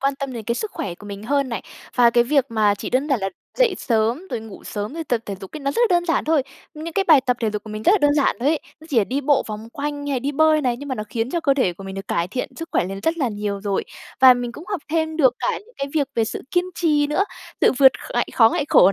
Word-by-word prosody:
quan 275 Hz, 0 st, +1 dB
tâm 275 Hz, -2 st, -4 dB
đến 230 Hz, -3 st, -6 dB
cái 235 Hz, -, -1 dB
sức 430 Hz, -, -3 dB
khỏe 175 Hz, -3 st, -4 dB
của 205 Hz, -, -13 dB
mình 200 Hz, 0 st, -7 dB
hơn 280 Hz, +2 st, 0 dB
này, 230 Hz, -, -4 dB, 0.3 s
và 240 Hz, -2 st, +5 dB
cái 240 Hz, 0 st, +4 dB
việc 275 Hz, 0 st, +3 dB
mà 215 Hz, -3 st, +2 dB
chỉ -, -, -6 dB
đơn 265 Hz, +4 st, +1 dB
giản 265 Hz, -7 st, +1 dB
là 195 Hz, -, -1 dB, 0.3 s
dậy -, -, +4 dB
sớm, 230 Hz, +8 st, 0 dB
rồi -, -, -2 dB
ngủ 220 Hz, -2 st, -11 dB
sớm, 210 Hz, +7 st, -5 dB
rồi 330 Hz, -1 st, -4 dB
tập 240 Hz, -5 st, 0 dB
thể 200 Hz, -, -3 dB
dục 195 Hz, -, -9 dB
ấy -, -, -7 dB
nó 275 Hz, 0 st, -1 dB
rất 380 Hz, -, -1 dB
là -, -, +6 dB
đơn 345 Hz, -, 0 dB
giản 330 Hz, -, +1 dB
thôi. 310 Hz, -3 st, +2 dB, 0.3 s
Những 320 Hz, +2 st, -6 dB
cái 390 Hz, +2 st, +1 dB
bài 310 Hz, -6 st, +7 dB
tập 250 Hz, -1 st, 0 dB
thể 225 Hz, -2 st, +1 dB
dục 210 Hz, -1 st, -4 dB
của 215 Hz, -, -9 dB
mình 215 Hz, 0 st, -5 dB
rất 365 Hz, -, +5 dB
là 420 Hz, -, +4 dB
đơn 290 Hz, -2 st, +3 dB
giản 285 Hz, -2 st, +2 dB
thôi 270 Hz, -, +2 dB
ấy, 315 Hz, -1 st, +2 dB, 0.2 s
nó 315 Hz, -, -14 dB
chỉ 255 Hz, -, +3 dB
là 205 Hz, -, +3 dB
đi 270 Hz, +6 st, -2 dB
bộ 280 Hz, -1 st, +3 dB
vòng 215 Hz, +1 st, -7 dB
quanh, 290 Hz, 0 st, -4 dB
hay 280 Hz, -, -1 dB
là 255 Hz, -, +1 dB
đi 280 Hz, +4 st, -2 dB
bơi 310 Hz, +1 st, +4 dB
này 250 Hz, -3 st, 0 dB
nhưng 285 Hz, +3 st, -8 dB
mà 260 Hz, -, -1 dB
nó 215 Hz, -, -4 dB
khiến 230 Hz, +2 st, -2 dB
cho 340 Hz, -, -1 dB
cơ 275 Hz, -4 st, +3 dB
thể 250 Hz, -10 st, +1 dB
của 195 Hz, +3 st, -11 dB
mình 190 Hz, 0 st, -6 dB
được 195 Hz, 0 st, -7 dB
cải 170 Hz, +1 st, 0 dB
thiện 250 Hz, +6 st, -3 dB
sức 330 Hz, 0 st, -6 dB
khỏe -, -, +2 dB
lên 195 Hz, +1 st, -5 dB
rất 325 Hz, +6 st, +1 dB
là 265 Hz, -, +1 dB
nhiều 205 Hz, -2 st, -3 dB
rồi. 200 Hz, -1 st, -1 dB, 0.4 s
Và 260 Hz, -1 st, +9 dB
mình 245 Hz, -1 st, -4 dB
cũng 310 Hz, -, -10 dB
học 395 Hz, -6 st, -2 dB
thêm 315 Hz, -1 st, 0 dB
được 260 Hz, -6 st, +4 dB
cả -, -, -1 dB
những 465 Hz, +4 st, -20 dB
cái 275 Hz, -, -1 dB
việc 285 Hz, -3 st, +1 dB
về 225 Hz, -, +2 dB
sự 220 Hz, -, -5 dB
kiên 355 Hz, 0 st, +2 dB
trì 300 Hz, -4 st, +2 dB
nữa, 330 Hz, +7 st, +1 dB, 0.4 s
tự -, -, +5 dB
vượt 265 Hz, -2 st, +8 dB, 0.2 s
kh -, -, -9 dB
ngại -, -, +1 dB
khó, 225 Hz, -2 st, +7 dB
ngại 290 Hz, -, 0 dB
khổ 190 Hz, +2 st, +6 dB
260 Hz, 320 wpm, -22 LUFS, 220-300 Hz, 0.4 s, Và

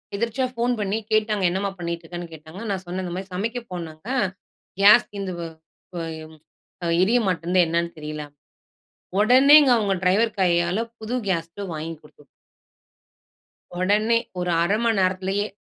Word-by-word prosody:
எதிர்ச்சியா 235 Hz, +5 st, -1 dB
phone 245 Hz, +1 st, +2 dB
பண்ணி 205 Hz, +1 st, -1 dB
கேட்டாங்க 215 Hz, -2 st, +1 dB
என்னம்மா 195 Hz, +2 st, -2 dB
பண்ணிட்ருக்கனு 170 Hz, 0 st, -5 dB
கேட்டாங்க. 160 Hz, +5 st, -11 dB
நான் 190 Hz, -1 st, -3 dB
சொன்ன 180 Hz, +2 st, -4 dB
இந்த 175 Hz, -, -5 dB
மாதிரி 190 Hz, 0 st, -7 dB
சமைக்க 225 Hz, +6 st, -2 dB
போனங்க 165 Hz, 0 st, -7 dB, 0.7 s
கேஸ் 210 Hz, +4 st, +7 dB
தீந்து 200 Hz, -2 st, -4 dB
போ 170 Hz, -, -4 dB, 0.5 s
போ 175 Hz, -, -4 dB, 0.2 s
எ -, -, -9 dB, 0.8 s
எரிய 230 Hz, +6 st, +3 dB
மாட்டேன்து 180 Hz, 0 st, 0 dB
என்னன்னு 170 Hz, +1 st, -1 dB
தெரியல. 150 Hz, 0 st, -6 dB, 1.0 s
ஒடனேங்க 265 Hz, +6 st, +7 dB
அவங்க 205 Hz, -3 st, +1 dB
டிரைவர் 210 Hz, +4 st, +2 dB
கையால 175 Hz, +2 st, +2 dB, 0.2 s
புது 220 Hz, +3 st, -5 dB
கேஸ் 165 Hz, -3 st, 0 dB
ஸ்டவ் 195 Hz, 0 st, -7 dB
வாங்கி 160 Hz, +2 st, -5 dB
குடுத்து 150 Hz, -1 st, -20 dB, 1.5 s
ஒடனே 210 Hz, +5 st, +2 dB, 0.2 s
ஒரு 180 Hz, 0 st, -2 dB
1/2 195 Hz, +5 st, +2 dB
மணி 230 Hz, -2 st, +2 dB
நேரத்துலையே 190 Hz, +2 st, 0 dB
190 Hz, 140 wpm, -23 LUFS, 170-215 Hz, 1.5 s, கேஸ்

